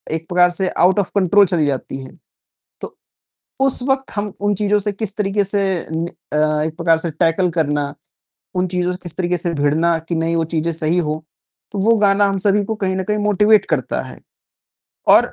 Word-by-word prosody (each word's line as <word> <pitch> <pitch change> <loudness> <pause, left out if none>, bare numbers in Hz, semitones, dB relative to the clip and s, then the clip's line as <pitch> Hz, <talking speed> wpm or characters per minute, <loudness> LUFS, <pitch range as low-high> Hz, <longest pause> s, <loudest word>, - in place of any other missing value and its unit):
एक 165 0 -5
प्रकार 180 0 +4
से 185 +1 -1
आउट 185 +3 +3
ऑफ 195 - -1
कंट्रोल 200 +1 +5
चली 170 -4 +1
जाती 135 -1 -3
है। - - -11 0.7
तो, - - -8 0.6
उस 270 -2 +1
वक़्त 270 0 0
हम 205 -1 -2
उन 205 0 +1
चीज़ों 210 +1 +1
से 205 0 -1
किस 205 0 -4
तरीके 205 0 0
से 200 +1 0 0.3
नि 165 +1 -1 0.3
अ, 150 0 +1
एक 160 0 -6
प्रकार 165 -2 +2
से 165 0 -3
टैकल 165 +3 +1
करना, 145 -3 -1 0.6
उन 180 0 +1
चीज़ों 180 0 -1
से 180 - -5
किस 175 - -4
तरीके 180 -1 0
से 170 0 -2
भिड़ना 160 +3 +1
कि 170 - -1
नहीं 165 +1 0
वो 165 - +1
चीजें 165 +1 0
सही 160 +2 0
हो, 155 -2 -2 0.5
तो 200 - -4
वो 225 +4 +4
गाना 200 0 +3
हम 195 -1 0
सभी 205 +1 +3
को 220 - -3
कहीं 185 0 0
न 190 - -2
कहीं 210 +2 -1
मोटिवेट 210 0 +4
करता 130 -5 -1
है। - - -10 0.9
और - - +5
180 Hz, 205 wpm, -19 LUFS, 160-205 Hz, 0.9 s, कंट्रोल